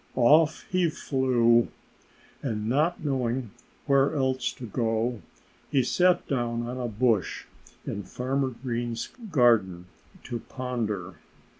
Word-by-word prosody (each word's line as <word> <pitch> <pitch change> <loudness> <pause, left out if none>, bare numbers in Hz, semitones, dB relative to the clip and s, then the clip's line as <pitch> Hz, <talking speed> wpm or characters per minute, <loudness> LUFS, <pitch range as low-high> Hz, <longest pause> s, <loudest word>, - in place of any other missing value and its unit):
Off 150 +6 +4
he 180 -2 +2
flew. 120 -5 +2 0.7
And 110 -5 -3
not 155 +7 +1
knowing 125 -4 -1 0.3
where 140 +1 +3
else 130 -2 0
to 125 - -8
go, 115 +1 -1 0.5
he 135 -2 +2
sat 180 +7 +2
down 120 -3 -1
on 125 +2 -5
a 125 - -2
bush 115 -2 0 0.4
in 100 - -3
Farmer 130 +6 -2
Green's 120 -2 -4 0.2
garden, 110 - +3 0.4
to 120 - -4
ponder. 110 -9 -4
125 Hz, 115 wpm, -27 LUFS, 115-135 Hz, 0.7 s, Off